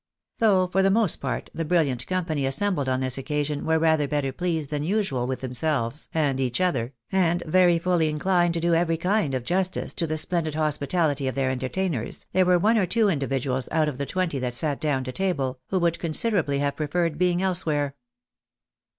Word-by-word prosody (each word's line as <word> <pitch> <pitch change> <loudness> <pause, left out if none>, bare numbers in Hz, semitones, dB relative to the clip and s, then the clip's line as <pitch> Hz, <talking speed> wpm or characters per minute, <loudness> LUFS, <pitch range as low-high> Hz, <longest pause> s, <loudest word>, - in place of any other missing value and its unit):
Though 200 -5 +4
for 185 +1 +1
the 195 - +3
most 210 -3 +3
part 130 -3 -4
the 165 - -3
brilliant 150 -7 0
company 165 -7 -1
assembled 145 0 0
on 130 0 0
this 130 0 0
occasion 150 +1 -2
were 160 0 +3
rather 160 -2 +2
better 145 -2 -1
pleased 160 -3 -2
than 150 -1 -1
usual 160 - -1
with 130 0 -3
themselves 130 0 -1
and 145 -5 0
each 130 +1 -1
other, 135 -9 0 0.2
and 175 -2 +2
very 175 +1 +4
fully 165 -2 +1
inchned 175 +2 +1
to 170 - -1
do 170 +1 +1
every 165 0 +2
kind 180 -5 0
of 130 - -3
justice 185 +6 -1
to 165 - -1
the 155 0 -2
splendid 160 -1 0
hospitality 150 -1 0
of 130 - -2
their 135 -1 0
entertainers, 130 - -3
there 185 -1 +3
were 180 -1 +5
one 220 +5 +3
or 190 - +1
two 220 +2 +2
individuals 135 -4 -1
out 155 -1 +2
of 140 -3 -4
the 140 - -2
twenty 180 -6 -1
that 125 -1 -3
sat 145 +2 -1
down 145 -4 0
to 130 - -5
table, 135 -7 -1
who 190 - -1
would 170 -2 +1
considerably 165 -3 +1
have 140 0 -1
preferred 160 +1 -1
being 180 0 +2
elsewhere. 155 -7 0
155 Hz, 195 wpm, -25 LUFS, 135-180 Hz, 0.2 s, were